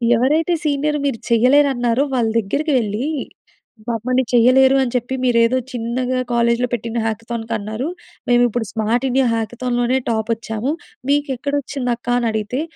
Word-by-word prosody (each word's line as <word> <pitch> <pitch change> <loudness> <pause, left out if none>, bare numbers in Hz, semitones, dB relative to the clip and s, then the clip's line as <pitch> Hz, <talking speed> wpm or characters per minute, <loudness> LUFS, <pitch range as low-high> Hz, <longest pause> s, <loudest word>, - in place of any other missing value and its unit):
ఎవరైతే 305 +9 +2
సీనియర్, 295 +1 0
"మీరు 260 -5 -1
చేయలేరన్నారో," 250 +1 +3
వాళ్ళ 235 -3 +1
దగ్గరకెళ్ళి, 240 0 -1 0.8
మమ్మల్ని, 250 +3 0
"చేయలేరు 260 +3 +5
అని 250 -1 -3
చెప్పి, 250 +2 -1
మీరేదో 235 0 +3
చిన్నగా 250 +1 -2
కాలేజ్‌లో 235 +1 +2
పెట్టిన 230 0 -3
హ్యాకథాన్‌‌కన్నారు, 225 +2 -3 0.4
మేమిప్పుడు 240 -2 +2
స్మార్ట్ 230 +4 0
ఇండియా 260 0 +2
హ్యాకథాన్‌ 240 +2 -2
లోనే 255 +2 +2
టాపోచ్చాము. 225 +3 -2 0.4
మీకెక్కడొచ్చింది 280 -2 -1
అక్కా?" 240 +1 -3
అని 235 -2 0
అడిగితే, 220 +5 -2
245 Hz, 120 wpm, -19 LUFS, 230-265 Hz, 0.8 s, చేయలేరు